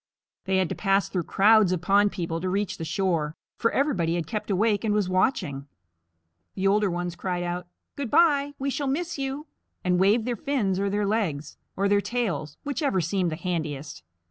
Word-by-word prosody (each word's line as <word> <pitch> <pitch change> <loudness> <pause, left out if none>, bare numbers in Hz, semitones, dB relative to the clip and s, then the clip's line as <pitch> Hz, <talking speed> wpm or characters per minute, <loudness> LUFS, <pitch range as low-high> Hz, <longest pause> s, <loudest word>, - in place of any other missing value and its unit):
They 190 0 +1
had 190 -2 +2
to - - -2
pass 195 -1 +1
through 180 -4 -2
crowds 210 -1 +5
of 185 - 0
pond 205 +1 +4
people 165 -2 -3
to 185 - -1
reach 200 +1 -1
the - - -3
shore, 165 -4 -1 0.2
for 230 - +3
everybody 185 - +1
had 170 -2 -2
kept 210 +7 -4
awake 205 +1 +2
and 210 -2 +1
was 205 -3 +1
watching. 180 - 0 0.9
The 190 - -2
older 205 +1 +3
ones 175 0 -3
cried 180 0 -2
out, 175 0 -4 0.3
"Good 280 -4 -4
bye; 290 -2 +3
we 275 +1 -2
shall 285 +1 -2
miss 330 +3 -2
you," 275 +2 -3 0.4
and 180 -1 +2
waved 210 +4 +3
their 245 -1 -1
fins 210 -7 -1
or 200 0 0
their 205 +1 0
legs, 185 -9 -1 0.2
or 200 +1 +2
their 200 0 +3
tails, 200 - -2
whichever 285 - 0
seemed 175 +1 0
the - - -2
handiest. 155 -5 -4
195 Hz, 195 wpm, -26 LUFS, 175-225 Hz, 0.9 s, crowds